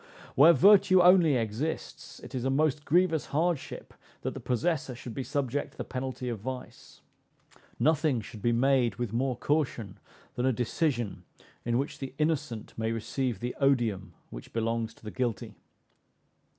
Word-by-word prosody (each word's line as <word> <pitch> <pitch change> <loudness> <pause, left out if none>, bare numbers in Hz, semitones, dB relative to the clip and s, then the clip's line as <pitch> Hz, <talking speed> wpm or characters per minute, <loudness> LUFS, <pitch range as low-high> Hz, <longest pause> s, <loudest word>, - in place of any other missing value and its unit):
Where 150 +5 +8
virtue 190 +1 +6
only 175 -4 +6
exists, 115 +7 -4
it - - -11
is 125 -2 -3
a 135 - 0
most 150 +1 +1
grievous 170 -1 +2
hardship 165 0 -2 0.3
that - - -2
the - - -7
possessor 135 0 -1
should 120 -1 -8
be 135 - -4
subject 140 0 -2
to - - -24
the - - -3
penalty 130 -1 -5
of 115 -3 -3
vice. 130 +4 -8 0.8
Nothing 155 -4 +2
should 105 -1 -10
be 120 - +2
made 125 0 +2
with 120 -3 -4
more 130 +2 0
caution 135 -10 -1 0.3
than 125 +2 0
a - - +4
decision 120 - -1 0.4
in 120 0 +1
which 140 +3 -3
the 135 -1 -7
innocent 150 -8 -2
may 110 0 -2
receive 115 0 -2
the 125 +1 -3
odium 120 -8 +1 0.2
which - - -10
belongs 115 0 -1
to - - -24
the 105 - -6
guilty. 120 -4 -3
130 Hz, 160 wpm, -29 LUFS, 115-150 Hz, 0.8 s, Where